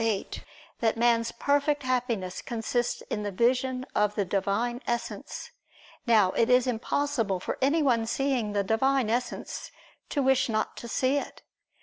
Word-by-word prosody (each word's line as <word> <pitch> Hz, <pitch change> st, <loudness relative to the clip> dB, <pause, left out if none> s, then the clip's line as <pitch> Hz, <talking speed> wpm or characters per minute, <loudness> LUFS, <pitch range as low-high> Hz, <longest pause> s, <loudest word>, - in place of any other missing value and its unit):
8) 220 Hz, -4 st, -2 dB, 0.4 s
that 225 Hz, -1 st, +1 dB
man's 230 Hz, 0 st, +3 dB
perfect 285 Hz, +3 st, +1 dB
Happiness 240 Hz, -8 st, -1 dB
consists 240 Hz, +1 st, -2 dB
in 210 Hz, -, -1 dB
the 205 Hz, -, -2 dB
vision 255 Hz, +4 st, +1 dB
of 210 Hz, 0 st, +1 dB
the 205 Hz, -, 0 dB
Divine 205 Hz, +6 st, -1 dB
Essence. 235 Hz, 0 st, -4 dB, 0.6 s
Now 215 Hz, -5 st, +5 dB
it 230 Hz, +4 st, +1 dB
is 250 Hz, 0 st, +5 dB
impossible 245 Hz, -4 st, 0 dB
for -, -, -4 dB
anyone 265 Hz, -5 st, +2 dB
seeing 245 Hz, -4 st, 0 dB
the 200 Hz, -1 st, +1 dB
Divine 235 Hz, +3 st, +2 dB
Essence, 245 Hz, +1 st, -3 dB, 0.4 s
to 285 Hz, -, 0 dB
wish 265 Hz, -1 st, +3 dB
not 215 Hz, -1 st, -1 dB
to 235 Hz, -, -7 dB
see 260 Hz, +4 st, +1 dB
It. -, -, -9 dB
235 Hz, 145 wpm, -28 LUFS, 220-260 Hz, 0.6 s, Now